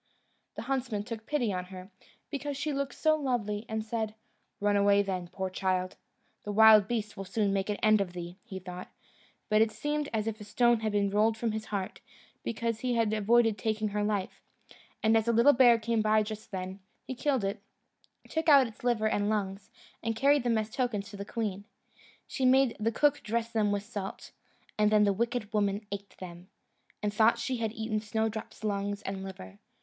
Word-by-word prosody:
The - - -5
huntsman 250 -5 -2
took 225 0 -7
pity 245 -9 0
on 180 0 -3
her, 185 +1 -11 0.4
because 285 -1 -3
she 290 +1 -2
looked 280 0 -3
so 310 -1 +3
lovely, 235 -7 -2
and 220 0 -3
said, 220 -1 -3 0.4
"Run 205 0 +2
away 200 0 +4
then, 185 -3 -3
poor 190 +1 -4
child!" 185 -1 -1 0.5
"The 205 - -4
wild 215 -1 +7
beasts 215 -3 -3
will 195 - -5
soon 200 +1 0
make 195 +1 -1
an 210 - 0
end 215 -1 +5
of 180 -3 -3
thee," 175 +1 -7
he 210 -5 -8
thought; 180 -1 -8 0.6
but 215 0 +3
it 225 - +4
seemed 295 +6 -2
as 215 -2 -1
if 220 -1 -4
a - - -6
stone 240 +3 +3
had 220 -1 -1
been 200 -1 +1
rolled 215 +2 +2
from 230 0 -1
his 220 0 -4
heart, 195 -3 -4 0.4
because 230 0 -2
he 250 0 -1
had 225 -2 +1
avoided 220 0 +3
taking 215 +1 -1
her 205 0 -1
life; 205 -2 -2 0.6
and 220 +1 +4
as 225 0 +2
a - - +4
little 235 +5 +6
bear 240 -2 +6
came 230 0 0
by 215 0 +3
just 215 0 -7
then, 185 0 -5 0.3
he - - -4
killed 260 -2 0
it, 200 +1 -2 0.7
took 320 0 0
out 280 -3 +8
its 225 -1 -11
liver 235 -3 +2
and 205 -1 0
lungs, 200 -2 -2 0.3
and 225 0 -2
carried 280 +4 +4
them 235 -2 +1
as 215 0 -2
tokens 220 -5 -2
to - - -9
the 200 - -4
queen. 205 -3 -3 0.6
She 265 - -4
made 260 -1 +4
the 225 +2 +1
cook 290 +5 +2
dress 230 +1 -2
them 215 -3 +1
with 200 0 -1
salt, 205 -3 -7 0.5
and 210 0 +4
then 210 -1 +5
the 200 -1 +3
wicked 230 0 -2
woman 205 0 0
ate 200 0 -7
them, 175 -1 -10 0.6
and 205 0 0
thought 225 +2 +4
she 255 +2 -2
had 225 -2 -2
eaten 220 -1 -2
Snowdrop's 220 0 -3
lungs 205 0 -2
and 195 0 -4
liver. 100 - -9
215 Hz, 200 wpm, -30 LUFS, 200-235 Hz, 0.7 s, out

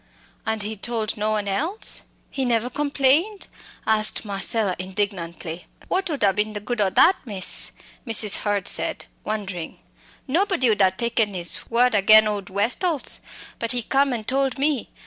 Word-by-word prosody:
"And 220 -1 0
he 215 +1 -4
told 220 0 -2
no 215 0 -1
one 210 -2 -1
else? 320 - 0 0.3
he 270 - -2
never 240 0 0
complained?" 290 +8 +2 0.4
asked 215 0 +1
Marcella, 200 -1 +1
indignantly. 185 -3 -4 0.2
"What 375 0 0
ud 290 -7 -2
ha 200 - +5
been 210 +2 -1
the 205 - -4
good 215 +2 -3
o' 195 - +3
that, 365 - +5
miss?" 200 -6 -2 0.4
Mrs. 220 -3 +4
Hurd 205 -3 -1
said, - - -1 0.2
wondering. 195 -6 -5 0.5
"Nobody 330 - +2
ud 210 - +1
ha 190 - +6
taken 220 +1 -1
his 175 -2 -1
word 245 +1 +3
agen 215 +1 +6
old 205 -3 -3
Westall's. 250 - 0 0.4
But 230 +1 0
he 245 -1 -1
come 275 +3 +2
and 225 -3 -4
told 270 0 0
me. 280 -3 0
220 Hz, 160 wpm, -23 LUFS, 200-260 Hz, 0.5 s, ha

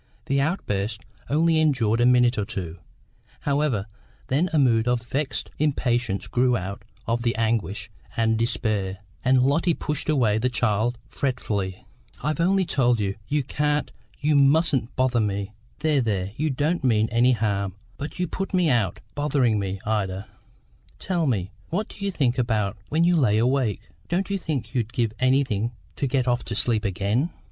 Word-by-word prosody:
The 140 0 +1
outburst 110 - -1 0.3
only 160 +2 +3
endured 120 -7 +2
a 120 - +5
minute 125 -2 +4
or - - +1
two, 90 -6 -5 0.6
however; 140 -8 0 0.4
then 155 +8 +2
a 160 - +1
mood 120 -5 +3
of 120 -1 +1
vexed 135 +4 -3
impatience 120 -8 0
grew 125 0 +2
out 95 0 -5 0.2
of 115 +1 0
the 115 0 0
anguish 110 -2 -1 0.3
and 110 -1 +3
despair, 110 -4 -1 0.3
and 130 0 +4
Lotty 160 +5 +2
pushed 150 0 -3
away 115 -8 +3
the 125 +3 +1
child 120 0 0
fretfully. 105 -8 -2 0.4
"I've 150 +1 -1
often 190 +2 +3
told 125 -7 +2
you, 100 -2 0
you 145 -1 +1
can't, 150 +2 0 0.3
you 150 +1 +2
mustn't 140 -3 +3
bother 130 -2 +2
me. 100 -1 -1 0.3
There, 155 -3 +3
there; 100 -5 -1
you 155 +3 0
don't 150 +5 0
mean 110 -4 +3
any 120 +2 +4
harm, 100 -4 -1 0.2
but 145 - -6
you 180 - 0
put 195 +4 -3
me 175 -4 +3
out, 105 -8 0
bothering 135 -7 +1
me, 95 -1 -3
Ida. 100 -2 -1 0.7
Tell 175 -4 -1
me, 100 -6 -1 0.2
what 205 +6 -2
do 200 - -10
you 200 - +1
think 130 -9 0
about 110 -4 0
when 160 +3 +2
you 175 +1 +4
lay 125 -10 +3
awake? 125 -1 +1 0.2
Don't 185 +3 -1
you 195 - 0
think 135 -10 -3
you'd 120 -3 -1
give 115 -3 0
anything 130 -4 +1 0.2
to 140 - 0
get 130 -1 0
off 125 0 +1
to 110 - -4
sleep 115 0 +1
again? 100 - 0
125 Hz, 170 wpm, -24 LUFS, 110-145 Hz, 0.7 s, a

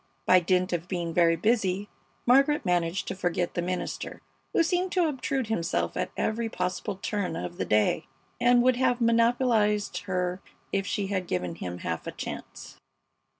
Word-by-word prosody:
By 185 - +6
dint 180 +1 +1
of 175 0 -2
being 175 -3 -3
very 170 0 +4
busy 200 0 +1 0.4
Margaret 275 +3 +4
managed 175 +1 0
to - - -3
forget 175 -1 -1
the 175 - -1
minister, 180 +1 -4 0.3
who - - +3
seemed 360 +2 0
to 360 -3 +3
obtrude 265 -2 -1
himself 165 - -1
at - - -1
every 225 +1 -1
possible 180 +1 -2
turn 205 -1 -2
of 85 0 -5
the 95 - -1
day, 105 +4 +2 0.3
and 245 0 +5
would 255 -1 +4
have 255 -1 +2
monopolized 230 -4 +2
her 180 -1 -1 0.3
if 195 0 0
she 205 - -1
had 185 -3 -2
given 90 -1 -2
him 90 +1 -6
half 80 -2 -4
a - - -2
chance. - - -8
190 Hz, 165 wpm, -27 LUFS, 175-235 Hz, 0.4 s, By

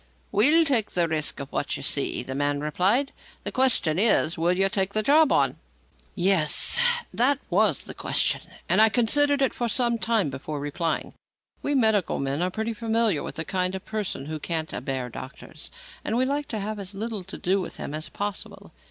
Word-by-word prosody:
"We'll 300 +10 +4
take 245 -8 +1
the 175 -1 0
risk 155 -2 -1
of 140 0 -7
what - - -2
you - - -8
see," - - -1
the 130 - -6
man 145 +1 -1
replied. 190 - 0 0.3
"The - - -4
question 240 - +2
is, 200 -6 +4
will 170 +2 +1
you 195 +1 +4
take 195 0 -1
the 215 - +2
job 300 +4 +4
on?" - - +2 0.6
Yes; 185 - +4 0.3
that 260 +4 +2
was - - +3
the - - -9
question, - - +1 0.3
and - - +3
I 220 - +6
considered 280 +5 +2
it 265 - +1
for 240 - -2
some 235 0 +1
time 220 -10 +1
before 145 +2 -6
replying. 155 +3 -3 0.5
We 290 - -1
medical 220 -7 +2
men 140 +3 -2
are 180 - +1
pretty 220 +4 -3
familiar 225 -5 0
with - - -6
the 160 - -4
kind 185 0 -1
of 190 - -8
person 210 -10 -4
who 155 +1 -5
"can't 160 0 -3
abear 130 -1 -4
doctors," 140 +6 -9 0.3
and 225 - -2
we 255 - +2
like 285 +2 -2
to 220 - -4
have 210 +1 -4
as 195 0 -6
little 215 -1 -4
to - - -8
do 190 +2 0
with 180 - -7
him - - -6
as 155 +1 -5
possible. 205 -1 -6
195 Hz, 195 wpm, -25 LUFS, 160-230 Hz, 0.6 s, I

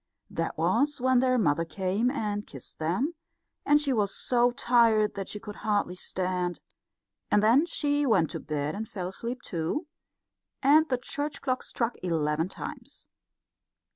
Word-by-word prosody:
That - - -3
was 290 0 +2
when 255 0 +3
their 255 0 +3
mother 165 -7 +2
came 190 +7 0
and 210 -6 -2
kissed 135 -4 -11
them, 185 - 0 0.5
and 295 0 +6
she 285 -3 0
was 205 -4 +1
so 245 -1 +3
tired 235 -4 +3
that 195 -1 -5
she 210 - -5
could 210 0 -9
hardly 205 -4 0
stand; 180 -1 -2 0.7
and 210 - +3
then 255 +10 +5
she 290 -3 0
went 185 -9 +3
to - - -4
bed 150 -1 -3
and 215 +1 -5
fell 180 -3 -4
asleep 235 +6 -5
too, 170 - -2 0.8
and 310 +4 +5
the 255 - +2
church 285 +4 -4
clock 255 -2 0
struck 235 0 -2
eleven 160 -1 0
times. - - -9
220 Hz, 155 wpm, -28 LUFS, 180-260 Hz, 0.8 s, and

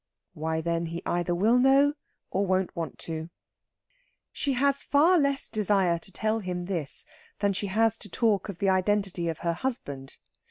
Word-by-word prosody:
Why 160 +1 -2
then 170 0 -1
he 170 +1 -6
either 175 0 0
will 220 +7 +4
know 275 +3 +5 0.4
or 195 - +1
won't 185 -1 0
want 165 -3 -4
to. 160 0 -5 1.0
She 280 - -1
has 280 +2 +2
far 330 +5 +4
less 280 -1 0
desire 195 -5 +1
to 190 - -13
tell 220 +3 0
him 180 -3 -4
this 170 -7 -2 0.3
than 200 -1 +1
she 200 +2 -2
has 220 +3 +2
to 205 - -10
talk 215 0 +1
of 195 - -6
the 195 - +1
identity 190 -2 +1
of 160 - -3
her 170 - +2
husband. 145 - -4
190 Hz, 170 wpm, -27 LUFS, 170-225 Hz, 1.0 s, know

